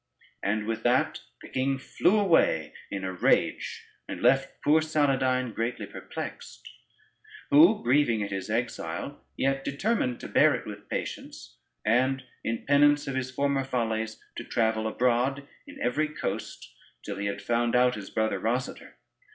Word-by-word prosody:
And 105 +2 -1
with 110 0 -2
that 120 +2 +2 0.2
the - - -9
king 135 +1 0
flew 180 +9 +2
away 165 - +3 0.2
in 100 -1 -4
a 95 0 -3
rage, 90 - +1 0.2
and - - -5
left 135 +3 +2
poor 155 +2 +5
Saladyne 130 -5 +1
greatly 115 +3 -2
perplexed; - - -8 0.8
who 170 +9 +6
grieving 120 -3 +3
at 100 - -5
his 95 +1 -4
exile, 115 - -3
yet 135 0 0
determined 140 - -1
to - - -6
bear - - +4
it - - -6
with - - -9
patience, - - -6 0.3
and 130 +4 +2 0.2
in 115 0 -3
penance 145 +1 +4
of 135 - -2
his 130 -1 -2
former 140 +1 0
follies 110 -4 -2 0.2
to - - -4
travel 110 -1 0
abroad 125 +4 +1 0.2
in - - -11
every 145 +6 +1
coast 105 - -5 0.3
till - - -5
he 100 0 -2
had 100 0 -3
found 120 +2 +1
out 125 0 +4
his 105 -4 -7
brother 110 0 0
Rosader. 125 +4 -3
125 Hz, 150 wpm, -27 LUFS, 110-140 Hz, 0.8 s, who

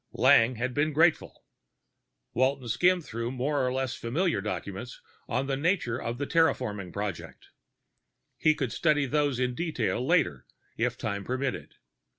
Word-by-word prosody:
Lang 115 +2 +5
had 125 +2 -2
been 150 +3 +1
grateful. 160 +1 +2 0.9
Walton 130 +1 +1
skimmed 175 - +2
through 115 +1 -4
more 135 +2 -1
or 125 - +1
less 130 0 -1
familiar 165 +10 -1
documents - - -5 0.3
on 130 - 0
the 135 0 -1
nature 145 -5 0
of 115 +1 -3
the 145 - -2
terraforming 125 - +1
project. 100 -2 -6 0.9
He 155 0 +4
could 130 -6 -2
study 150 -3 +2
those 145 -2 0
in 125 -1 0
detail 125 -6 -1
later, 135 - +1 0.3
if - - -1
time 100 -2 -3
permitted. 130 +4 -3
130 Hz, 145 wpm, -28 LUFS, 120-150 Hz, 0.9 s, Lang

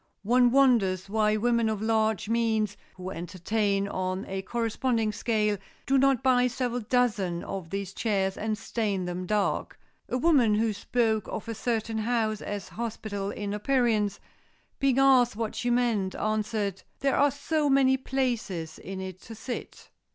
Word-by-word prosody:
One 245 +3 +4
wonders 230 -9 +3
why 215 0 +2
women 235 0 +2
of 215 -2 -2
large 220 -2 +1
means, 220 -2 +1 0.2
who 185 0 -6
entertain 200 +3 -1
on 185 0 -3
a 190 0 -3
corresponding 230 +1 0
scale, 210 -2 0 0.3
do 270 +1 +3
not 270 -1 +3
buy 250 -1 +4
several 245 0 -2
dozen 210 -7 0
of 190 -4 -6
these 195 0 -4
chairs 195 -4 0
and 215 0 -2
stain 210 -4 -2
them 180 +1 -4
dark. 210 0 -1 0.3
A 250 - 0
woman 255 -7 +4
who 220 0 +1
spoke 220 +1 0
of 220 - -5
a 230 - -3
certain 225 0 -2
house 220 -2 0
as 205 -1 -5
hospitable 215 -3 -4
in 205 0 -4
appearance, 215 -3 +1 0.6
being 270 -2 +2
asked 260 -4 +5
what 220 0 -3
she 245 - -2
meant, 235 -6 +1
answered, 215 -2 -1 0.2
"There 275 -1 +2
are 285 +1 +4
so 290 +1 -1
many 270 -1 +4
places 240 -11 -2
in 190 0 -6
it 185 -1 -7
to 225 - -9
sit." 240 +3 -7
220 Hz, 155 wpm, -27 LUFS, 200-245 Hz, 0.6 s, asked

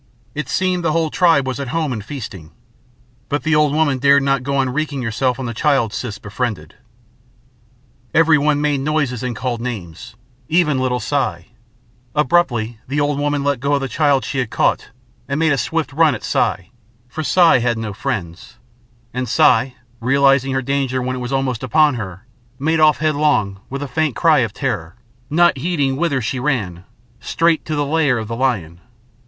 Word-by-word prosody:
It 150 - -5
seemed 185 -1 0
the 160 -2 +1
whole 160 -1 0
tribe 165 -7 +3
was 130 0 -3
at 140 - -4
home 155 -1 -1
and 110 -4 -5
feasting. 105 - -8 0.8
But 145 - -1
the 160 +1 +1
old 150 -1 +3
woman 145 -3 +1
dared 140 +1 +4
not 135 -1 +1
go 140 +2 -2
on 135 -1 +1
wreaking 145 -1 -2
herself 120 +2 0
on 130 - -4
the 120 - -4
child 120 -3 +1
Siss 115 -4 -4
befriended. 105 -7 -4 1.4
Everyone 150 -2 +3
made 145 -2 +1
noises 140 -4 -1
and 125 -2 -3
called 120 0 -3
names 105 -7 -7 0.3
even 155 -5 +2
little 125 -1 0
Si. 110 -7 -2 0.6
Abruptly 125 -7 +1
the 140 +3 -1
old 145 -1 0
woman 145 -1 0
let 140 -2 0
go 140 +3 +1
of 140 - -1
the 135 - -2
child 140 -1 +1
she 135 - -3
had 125 -4 -1
caught - - 0 0.4
and 140 +2 -2
made 160 -1 +3
a - - 0
swift 160 +5 -2
run 155 -2 +3
at - - -9
Si 95 +2 -1 0.4
for 140 +6 -5
Si 170 -2 +4
had 120 -1 0
no 110 -2 -4
friends; 95 0 -5 0.6
and 125 0 -3
Si, 125 +2 +3 0.2
realising 135 +2 +3
her 135 0 -1
danger 135 -1 -1
when 130 0 -2
it - - -5
was 125 +1 -5
almost 135 -4 -1
upon 150 +3 +3
her, 100 -3 -7 0.3
made 160 +3 0
off 155 -1 +5
headlong, 145 -10 +1
with 140 +2 -4
a - - -4
faint 150 +1 -1
cry 160 -3 +4
of 115 -5 0
terror, 105 - -3 0.3
not 170 -2 +3
heeding 145 -4 0
whither 140 -3 0
she 125 +4 -2
ran, 105 -11 -2 0.3
straight 165 -1 +1
to 155 - -3
the 145 -1 0
lair 145 -3 +1
of 110 -1 -4
the 115 - -4
lion. 95 -10 -1
135 Hz, 185 wpm, -19 LUFS, 120-150 Hz, 1.4 s, off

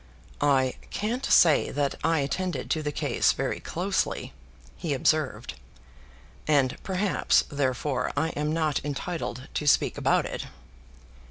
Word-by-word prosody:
"I 135 -3 +2
can't 235 +5 -2
say 160 -4 +5
that 145 -1 -1
I 165 -2 +2
attended 180 +6 -2
to 160 - +1
the 150 -1 -2
case - - +1
very - - -2
closely," 190 +3 -2 0.4
he 155 -5 -2
observed, 145 - 0 0.9
"and 140 -4 +3
perhaps, 190 +1 +1
therefore, 130 -2 -1
I 160 +3 +1
am 150 -1 -2
not 155 -2 0
entitled 145 -3 -4
to 150 - -2
speak - - +3
about - - +2
it." - - -5
150 Hz, 125 wpm, -27 LUFS, 140-165 Hz, 0.9 s, say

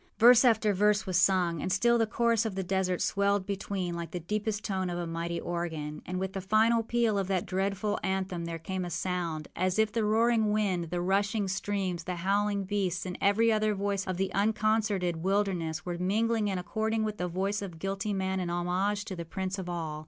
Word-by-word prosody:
Verse 245 +1 +8
after 220 -4 +4
verse 210 +2 +2
was 185 -2 +1
sung; 180 -4 +2
and 185 - -2
still 235 +5 +3
the 225 - +2
chorus 230 0 +2
of 220 -4 -3
the 190 - -2
desert 185 -1 0
swelled 200 -1 +1
between 190 -2 -3
like 170 -1 -5
the 180 - -4
deepest 210 +4 -2
tone 190 -3 -1
of 175 - -3
a 175 - -2
mighty 170 +1 -3
organ; 160 -3 -4
and 180 0 -3
with 190 0 -3
the 195 - -3
final 220 +4 +3
peal 225 -2 +1
of 195 - -2
that 190 -2 0
dreadful 200 +2 -1
anthem 190 -3 -2
there 165 0 -4
came 185 +3 -4
a 175 - -4
sound, 170 -3 -2
as 185 +1 0
if 220 -1 +3
the 225 0 0
roaring 220 0 +3
wind, 195 -5 +1
the 175 +2 -3
rushing 200 +3 +1
streams, 190 -3 -2
the 180 - -3
howling 200 +3 0
beasts, 185 -2 -1
and 180 -1 -4
every 225 +3 +4
other 215 -1 +2
voice 200 0 -1
of 185 -1 -2
the 190 0 -1
unconcerted 210 -3 +1
wilderness 180 -3 -1
were 175 -1 -4
mingling 215 +3 +1
and 190 -2 -1
according 220 +4 -1
with 215 -1 -3
the 180 - -1
voice 195 +4 -1
of 185 -5 -7
guilty 195 +4 -3
man 190 -1 -1
in 180 -2 -2
homage 185 +4 0
to 195 - -5
the 170 - -5
prince 190 +3 -4
of 180 -1 -5
all. 160 -3 -4
190 Hz, 210 wpm, -29 LUFS, 180-210 Hz, -, Verse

